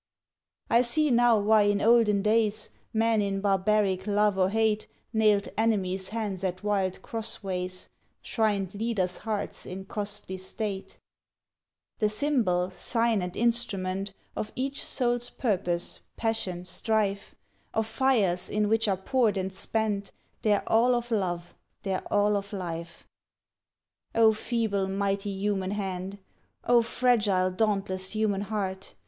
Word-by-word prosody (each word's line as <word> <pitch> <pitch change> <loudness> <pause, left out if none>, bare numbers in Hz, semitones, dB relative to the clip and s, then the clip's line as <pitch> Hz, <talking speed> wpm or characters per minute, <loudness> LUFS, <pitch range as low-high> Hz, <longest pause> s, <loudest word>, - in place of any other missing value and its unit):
I 235 - +5
see 285 +4 +1
now 240 -1 +5
why 215 +1 +4
in 205 0 +2
olden 220 -3 +4
days 215 0 +1 0.2
Men 225 -1 +2
in 195 -1 -1
barbaric 195 0 +1
love 205 0 +3
or 190 -1 +2
hate 220 0 +1 0.3
Nailed 210 -2 +3
enemies' 195 -4 0
hands 210 -4 -3
at 185 0 -2
wild 195 -3 0
crossways, 190 -5 -3 0.4
Shrined 205 -4 0
leaders' 205 -4 -1
hearts 215 -2 -4
in 190 +1 -6
costly 200 -2 -4
state: 195 +1 -5 1.0
The 215 - +3
symbol, 210 -8 +1
sign, 230 +2 +1
and 180 0 -5
instrument 195 -5 0 0.2
Of 215 - -4
each 270 +2 -2
soul's 245 -2 0
purpose, 180 -7 -1 0.2
passion, 190 -6 -1
strife, 200 +1 -1 0.4
Of 220 - 0
fires 215 -8 +1
in 210 0 +1
which 225 0 +2
are 195 -2 +1
poured 220 +1 +1
and 190 0 -2
spent 205 0 -2 0.3
Their 210 -2 +1
all 240 +3 +4
of 240 0 -3
love, 175 -5 -1 0.3
their 190 -2 -1
all 205 0 +3
of 200 0 -3
life. 170 -4 -6 1.1
O 225 -1 +6
feeble, 215 -3 -1
mighty 200 +1 -1
human 195 -1 -1
hand! 195 -1 -4 0.5
O 240 -1 +5
fragile, 215 -6 +2
dauntless 190 -1 -1
human 210 -2 +1
heart! 195 -2 -4
205 Hz, 130 wpm, -28 LUFS, 190-225 Hz, 1.1 s, O